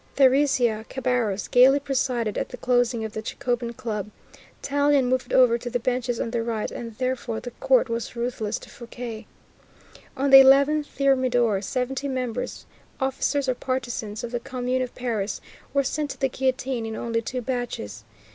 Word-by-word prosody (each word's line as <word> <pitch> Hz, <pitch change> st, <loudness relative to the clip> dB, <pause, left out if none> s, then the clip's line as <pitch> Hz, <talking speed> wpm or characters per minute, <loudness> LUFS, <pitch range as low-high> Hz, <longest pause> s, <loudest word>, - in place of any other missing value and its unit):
Thérézia 260 Hz, -5 st, +3 dB
Cabarrus 245 Hz, -7 st, -1 dB
gaily 260 Hz, +3 st, +6 dB
presided 255 Hz, -5 st, -1 dB
at -, -, -2 dB
the 250 Hz, -, -8 dB
closing 245 Hz, -2 st, +1 dB
of 220 Hz, -, -6 dB
the 220 Hz, -, -4 dB
Jacobin 240 Hz, 0 st, -2 dB
Club, 220 Hz, -4 st, -4 dB, 0.5 s
Tallien 285 Hz, -1 st, +2 dB
moved 255 Hz, 0 st, -1 dB
over 240 Hz, -2 st, +5 dB
to 245 Hz, -, -5 dB
the 245 Hz, -, 0 dB
benches 245 Hz, 0 st, -1 dB
on 230 Hz, -, -2 dB
the 235 Hz, -1 st, 0 dB
right, 225 Hz, -2 st, -2 dB
and 230 Hz, -2 st, -7 dB
therefore 255 Hz, -3 st, -2 dB
the 245 Hz, -, -7 dB
court -, -, +4 dB
was 230 Hz, +1 st, -4 dB
ruthless 235 Hz, -3 st, -2 dB
to -, -, -12 dB
Fouquier. 235 Hz, -2 st, -8 dB, 0.9 s
On 275 Hz, +1 st, +1 dB
the 270 Hz, -, +12 dB
11 280 Hz, +3 st, +6 dB
Thermidor, 255 Hz, -7 st, +2 dB
seventy 255 Hz, +6 st, -2 dB
members, 255 Hz, -3 st, -3 dB, 0.3 s
officers, 270 Hz, +1 st, 0 dB
or 255 Hz, -, +2 dB
partisans 240 Hz, -5 st, -4 dB
of 235 Hz, -, -5 dB
the 240 Hz, -, -2 dB
Commune 255 Hz, 0 st, -2 dB
of 250 Hz, -, -4 dB
Paris, 220 Hz, -5 st, -2 dB, 0.3 s
were 280 Hz, 0 st, +2 dB
sent 295 Hz, +2 st, -2 dB
to -, -, -7 dB
the 270 Hz, -, +1 dB
guillotine 260 Hz, -2 st, -1 dB
in 220 Hz, -, -5 dB
only 230 Hz, 0 st, -2 dB
two 250 Hz, +2 st, -4 dB
batches. 240 Hz, -, -4 dB
250 Hz, 165 wpm, -25 LUFS, 230-265 Hz, 0.9 s, the